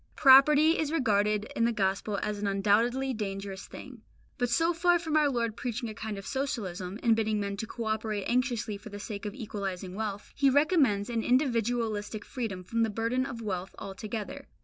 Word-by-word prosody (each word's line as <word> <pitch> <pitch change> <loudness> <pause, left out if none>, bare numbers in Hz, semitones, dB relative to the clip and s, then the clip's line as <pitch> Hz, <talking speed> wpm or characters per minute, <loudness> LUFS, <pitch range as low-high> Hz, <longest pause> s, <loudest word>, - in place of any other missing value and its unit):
Property 300 +4 +7
is 310 -2 0
regarded 210 -7 +2
in 230 - +2
the 235 - +2
Gospel 200 -1 -1
as 210 -1 -2
an 205 - -1
undoubtedly 225 +7 +2
dangerous 195 -2 -5
thing; 250 -4 -11 0.4
but 245 -1 +1
so 330 +8 +2
far 350 +1 +3
from 320 -2 -3
our 300 -2 +4
Lord 235 -4 -1
preaching 240 -1 -3
a - - -6
kind 215 -1 -5
of 195 - -8
socialism, 205 -9 -3
and 230 -2 +5
bidding 215 -1 0
men 200 -1 -2
to 220 - -4
co 235 - -6
operate 215 -2 -2
anxiously 240 -4 0
for 210 - -11
the 205 - -7
sake 205 0 -5
of 205 - -6
equalising 195 -6 -5
wealth, 205 -1 -5
He 280 -1 +4
recommends 270 - +3
an 230 -1 0
individualistic 230 -4 0
freedom 220 -8 -4
from 230 +5 -1
the 225 - +2
burden 230 +5 -1
of 230 -3 -7
wealth 190 -3 -4
altogether. 210 +2 -6
220 Hz, 190 wpm, -29 LUFS, 205-255 Hz, 0.4 s, Property